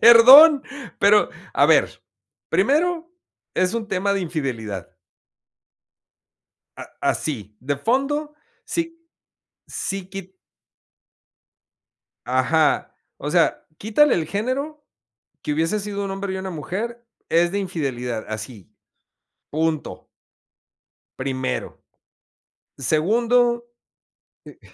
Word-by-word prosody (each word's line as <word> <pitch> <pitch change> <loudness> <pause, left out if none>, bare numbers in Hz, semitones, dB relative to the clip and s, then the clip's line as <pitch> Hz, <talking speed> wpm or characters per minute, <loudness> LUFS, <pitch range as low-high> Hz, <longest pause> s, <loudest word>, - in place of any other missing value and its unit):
perdón, 265 +6 +9 0.4
pero, 205 +1 +5 0.2
a - - +4
ver, - - +2 0.5
primero 335 +3 +1 0.4
es 185 +4 +1
un 225 -2 -3
tema 195 +1 0
de 195 - -1
infidelidad. 120 - -4 1.9
A - - -6
ah, - - -17
así, 105 -8 -2
de 140 +2 -2
fondo 275 - -1 0.3
sí 330 -3 -4 0.6
sí 195 -1 -5
qui 195 0 -6 2.1
Ajá, 130 +5 +1 0.2
o - - -5
sea, - - +1
quítale 235 +8 +3
el 165 - -1
género, 275 +8 -3 0.6
que 150 - -1
hubiese 165 +8 0
sido 200 0 -4
un - - -4
hombre 195 0 -4
y 190 - -3
una 190 0 -5
mujer 220 - -5 0.2
es 170 +1 +3
de 200 - -1
infidelidad, 130 - -3
así, 110 -2 -8 0.8
punto. 160 0 -2 1.1
Primero, 130 -1 -3 1.0
segundo, 235 - +2 0.8
eh - - -14
195 Hz, 95 wpm, -22 LUFS, 150-240 Hz, 2.1 s, perdón